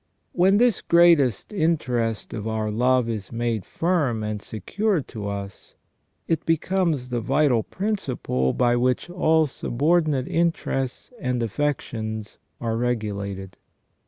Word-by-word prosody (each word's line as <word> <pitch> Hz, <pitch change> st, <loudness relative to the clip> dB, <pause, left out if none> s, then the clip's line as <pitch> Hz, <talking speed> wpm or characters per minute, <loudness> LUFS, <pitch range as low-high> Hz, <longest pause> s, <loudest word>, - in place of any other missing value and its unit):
When 190 Hz, +3 st, +4 dB
this 240 Hz, 0 st, +3 dB
greatest 170 Hz, -, +4 dB
interest 125 Hz, -, 0 dB
of 110 Hz, 0 st, -4 dB
our 110 Hz, -1 st, -1 dB
love 125 Hz, +2 st, +2 dB
is 110 Hz, -4 st, -4 dB
made 115 Hz, -4 st, -2 dB
firm 150 Hz, -11 st, 0 dB
and 105 Hz, -1 st, -3 dB
secure 195 Hz, -, -1 dB
to 105 Hz, -5 st, -7 dB
us, 100 Hz, -1 st, -7 dB, 0.5 s
it 165 Hz, -2 st, 0 dB
becomes 165 Hz, -5 st, 0 dB
the 120 Hz, -1 st, -1 dB
vital 125 Hz, 0 st, +2 dB
prin 210 Hz, -, -2 dB
ciple 65 Hz, -, -2 dB
by 120 Hz, -1 st, +3 dB
which 125 Hz, +7 st, 0 dB
all 160 Hz, -3 st, +3 dB
subordinate 150 Hz, +1 st, +1 dB
interests 165 Hz, -, -1 dB
and 125 Hz, -, -1 dB
affections 110 Hz, -4 st, -3 dB, 0.2 s
are 115 Hz, -1 st, -1 dB
regulated. 100 Hz, -5 st, -3 dB
125 Hz, 125 wpm, -24 LUFS, 110-165 Hz, 0.5 s, When